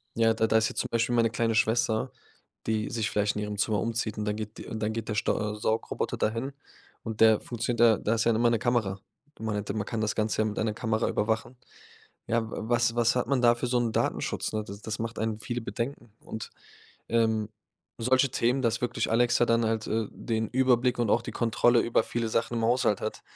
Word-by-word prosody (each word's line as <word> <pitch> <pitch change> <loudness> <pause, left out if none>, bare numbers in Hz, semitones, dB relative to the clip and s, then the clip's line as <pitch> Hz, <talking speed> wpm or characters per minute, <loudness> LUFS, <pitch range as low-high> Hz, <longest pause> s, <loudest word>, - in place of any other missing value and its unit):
„Ja, 115 -1 +4
da 110 0 +1
da 110 - +4
ist 110 - +2
jetzt - - -2
zum - - -5
Beispiel 115 +1 +1
meine 115 -1 +3
kleine 115 -1 0
Schwester, 110 0 +1 0.6
die 110 -1 0
sich 115 -3 -1
vielleicht 105 0 +1
in 105 - -1
ihrem 105 0 -4
Zimmer 105 0 +1
umzieht, 115 -1 -2
und 105 - -2
dann 105 0 -1
geht 110 0 -6
die - - -8
und 110 - -5
dann 110 0 0
geht 115 -1 -4
der 105 - -1
Stau 105 0 0
Saugroboter 110 +1 -2
dahin.“ 115 +5 -1 0.5
Und 110 -1 -5
der 110 -1 +7
funktioniert 120 0 -3
da 115 -3 +6
da 110 - 0
ist 110 - 0
ja 115 - +4
immer 120 +1 +3
'ne 115 - +1
Kamera. 110 -6 0 0.4
Man 110 -1 -2
hätte 100 -1 -3
man 105 -2 -2
kann 115 -2 -3
das 110 0 0
Ganze 110 0 0
ja 110 - +2
mit 105 - -3
einer 110 -1 0
Kamera 110 0 -1
überwachen. 110 +3 -1 0.7
Ja, 115 -1 0
wa - - -5
was 120 -1 +2
was 120 0 +3
hat 125 -2 0
man 135 -1 +1
da 120 -1 +5
für 120 - -3
so 125 0 +1
'n 120 -2 0
Datenschutz, - - -1
ne? 110 0 -1
D 100 - -7
das 110 -1 -4
macht 115 0 -4
einen 110 -1 -2
viele 120 +1 -4
Bedenken. 120 -1 -5
Und, 110 -1 -7 0.6
ähm, 110 -2 +1 0.5
solche 130 +3 +3
Themen, 125 +1 +1
dass 115 0 +1
wirklich 115 -2 -1
Alexa 120 +1 +3
dann 115 0 +2
halt, 110 -1 -1
äh, 110 -1 -1
den 110 -2 -2
Überblick 125 -1 +2
und 115 -3 +1
auch - - +3
die - - -6
Kontrolle 120 +1 +3
über 115 -1 +2
viele 115 -1 -2
Sachen 115 +2 -1
im 115 - 0
Haushalt 115 -4 +2
hat, 110 - -4
115 Hz, 230 wpm, -28 LUFS, 110-120 Hz, 0.7 s, der